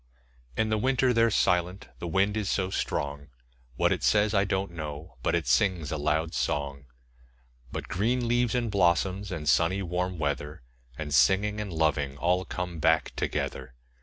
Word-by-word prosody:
In 110 - +1
the 110 -1 +1
winter 130 +1 +2
they're 115 0 +4
silent 90 -2 +1
the 85 - -4
wind 95 +5 +1
is 105 -3 -1
so 95 -1 0
strong; 70 -4 -3 0.5
What - - +2
it - - 0
says, 105 0 +3
I 100 -1 +3
don't 95 -1 -1
know, 75 -4 -7
but - - +1
it - - -1
sings 90 -8 +1
a 80 - -1
loud 75 +2 0
song. 70 -1 -2 0.9
But - - -5
green 120 +6 0
leaves, 120 0 +1
and 120 -3 0
blossoms, 95 +1 +1
and 80 -4 -5
sunny 90 +6 +3
warm 90 +1 -2
weather, 75 -2 -3 0.3
5 70 - -10
And 75 -1 -4
singing, 100 - +3
and 100 -2 -5
loving 75 -4 0
all 90 +4 +1
come 90 -2 -5
back 80 0 +2
together. 65 - -3
90 Hz, 170 wpm, -28 LUFS, 75-105 Hz, 0.9 s, they're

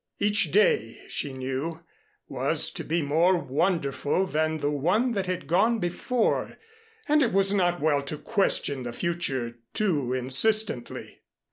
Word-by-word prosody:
Each 210 +1 +1
day, 115 - +2
she 145 - -3
knew, 135 +5 -4 0.5
was - - 0
to - - -6
be 165 0 -1
more 165 +6 +3
wonderful 160 +2 0
than 155 -2 -1
the 145 -1 -1
one 180 - +1
that 195 -4 -2
had 180 -4 -3
gone 195 +10 +2
before 220 +6 -1 0.5
and 300 0 +3
it 240 - +2
was 195 +1 +3
not 175 -3 +1
well 145 -2 +2
to 140 +2 -6
question 170 - 0
the 120 -1 -6
future 130 -8 -3 0.2
too 155 -12 0
insistently. 135 - +1
170 Hz, 140 wpm, -26 LUFS, 140-195 Hz, 0.5 s, more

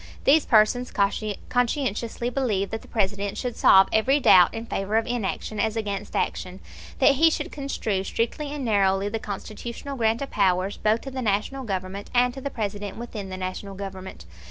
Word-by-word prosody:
These 295 +2 +4
persons 230 +3 +4
conscientiously 230 +3 -1
believe 220 -7 -1
that 225 0 -4
the - - -16
President 200 -1 -1
should 250 -2 -3
solve 190 0 +6
every 260 +6 +3
doubt 180 -9 +7
in 225 0 -6
favor 205 -1 -1
of 225 - +1
inaction 215 -2 -3
as 220 +1 0
against 205 -2 -4
action, 185 +1 -2 0.4
that 275 - +4
he 325 +3 +6
should - - -3
construe 225 -9 -2
strictly 240 +8 -2
and 290 -3 -4
narrowly 195 -2 +2
the 225 +2 -3
Constitutional 220 +6 -6
grant 230 +1 +1
of 275 - -7
powers 190 -1 +1
both 215 +2 +1
to 270 - -7
the 260 0 -4
National 220 +5 -1
Government, 195 -2 -4
and 245 0 +4
to 270 - -8
the 280 - -3
President 205 -4 -4
within 220 -4 -6
the 185 - -5
National 185 +2 -5
Government. 190 - -8
215 Hz, 180 wpm, -25 LUFS, 195-245 Hz, 0.4 s, doubt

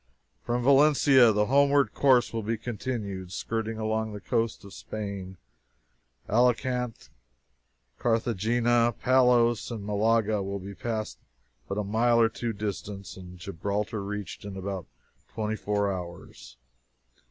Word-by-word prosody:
From 120 0 -1
Valencia, 140 -3 +6
the 105 0 +2
homeward 140 -1 +3
course 130 -4 +3
will 115 - -1
be 110 +2 -2
continued, 105 -5 -5
skirting 110 +2 -3
along 110 0 -2
the 105 - -6
coast 115 0 -2
of 100 - -11
Spain. 100 -4 -6 0.9
Alicant, 125 0 0 0.9
Carthagena, 120 +1 +2
Palos, 125 -3 +3
and 110 -4 -6
Malaga 110 0 +1
will 100 +1 -3
be 100 +1 -8
passed 110 +1 -4 0.5
but 100 - -4
a 105 - 0
mile 115 +4 +2
or 115 -1 +5
two 120 0 -3
distant, 100 -1 -5
and 90 -1 -11
Gibraltar 100 +4 -3
reached 100 -2 -6
in 100 -1 -7
about 95 -2 -5 0.5
twenty 110 -1 -1
four 105 -2 -1
hours. 85 -9 -9
110 Hz, 125 wpm, -27 LUFS, 100-120 Hz, 0.9 s, Valencia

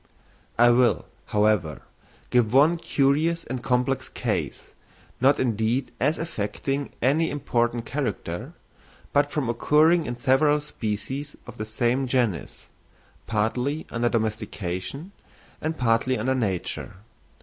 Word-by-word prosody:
I 120 +1 +6
will, 120 0 +3 0.2
however, 105 -8 +1 0.5
give 120 -3 +3
one 150 +7 +5
curious 155 +3 +1
and 125 0 -5
complex 125 +2 0
case, - - -3 0.5
not 135 +3 +4
indeed 120 +1 0
as 150 +6 +2
affecting 135 0 -3
any 155 +6 +3
important 120 -4 -1
character, 125 - -4 0.6
but 145 0 +3
from 145 -5 -1
occurring 155 +7 +3
in 120 - -4
several 140 +4 +3
species 135 +1 -4
of 125 -1 -11
the 110 - -4
same 120 +4 0
genus, 120 -8 -1 0.6
partly 125 +7 -1
under 120 0 +1
domestication 110 - -3 0.5
and 160 +1 -2
partly 125 +1 +2
under 125 +5 0
nature. 100 -4 -2
125 Hz, 115 wpm, -25 LUFS, 110-145 Hz, 0.6 s, I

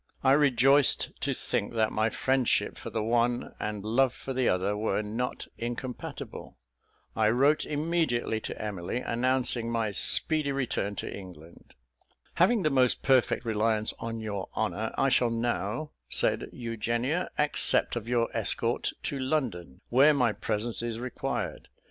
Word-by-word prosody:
I 135 - +5
rejoiced 140 -1 +4
to - - 0
think - - -2
that 110 -1 +2
my 110 +1 +1
friendship 130 +1 +1
for - - -7
the 110 -2 -2
one, 120 +2 0
and 105 -1 -4
love 125 +3 +2
for 135 - -6
the 130 -1 +1
other, 95 +3 0
were 105 0 -1
not 115 +4 -3
incompatible. 120 - -6 0.6
I 110 -1 +3
wrote 140 +6 +3
immediately 150 -7 0
to - - -7
Emily, 100 -1 -4
announcing 125 -1 +1
my 115 -2 -1
speedy 150 - +4
return 125 -7 -2
to - - -5
England. 85 -4 -13 0.6
"Having 195 +4 +3
the 155 - +2
most 130 -2 +2
perfect 130 -2 +2
reliance 110 -1 +1
on 115 0 -4
your 100 -3 -4
honour, - - -1
I 135 - +3
shall 125 -2 +3
now," 120 +3 -2 0.2
said - - 0
Eugenia, 120 +7 -2
"accept 150 -4 +3
of 115 -1 -5
your 120 -1 0
escort - - 0
to 140 - -3
London, 125 - -2
where 140 +5 +5
my 125 -5 +2
presence 110 +3 -2
is 115 -1 -3
required. 125 0 -4
120 Hz, 145 wpm, -28 LUFS, 110-135 Hz, 0.6 s, I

